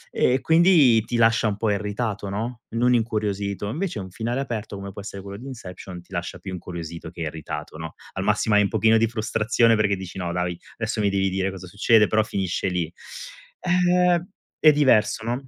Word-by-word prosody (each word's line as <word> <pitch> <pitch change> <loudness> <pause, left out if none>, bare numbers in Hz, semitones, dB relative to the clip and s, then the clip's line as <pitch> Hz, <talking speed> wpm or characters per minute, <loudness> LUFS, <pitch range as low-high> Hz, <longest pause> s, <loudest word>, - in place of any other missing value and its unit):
E 130 +2 +2
quindi 160 -9 +5
ti 120 - -3
lascia 115 -1 +4
un 105 - 0
po' 105 0 0
irritato, 105 0 -2
no, 115 +4 -4
non 125 +2 +3
incuriosito. 105 -3 -1
Invece 160 - -3
un 95 -1 -7
finale 120 +6 -2
aperto 115 -5 -4
come 100 0 -7
può 100 - -10
essere 100 -1 -7
quello 100 0 -8
di 125 - -11
Inception 90 -7 -9
ti - - -27
lascia 85 +1 -4
più 95 +2 -7
incuriosito 85 -2 -7
che 85 -1 -10
irritato, 80 -1 -5
no, 80 -1 -7 0.2
al - - -3
massimo 110 - +2
hai 105 - +6
un - - +2
pochino 110 +2 +3
di 115 +1 +3
frustrazione 115 +1 +2
perché 105 -2 +2
dici: 95 0 -8
"No, 85 -1 -2
dai, 90 -1 -2 0.2
adesso 110 -1 -2
mi 100 -1 +2
devi 95 0 +1
dire 95 +1 -1
cosa 95 -1 -8
succede." 105 +3 +4
Però 110 0 +3
finisce 95 -2 -2
lì. 90 -3 -2 0.7
Ehm 180 -1 +3 0.3
è 155 - +7
diverso, 115 -7 +3
no? 125 +3 -3
105 Hz, 200 wpm, -24 LUFS, 95-120 Hz, 0.7 s, è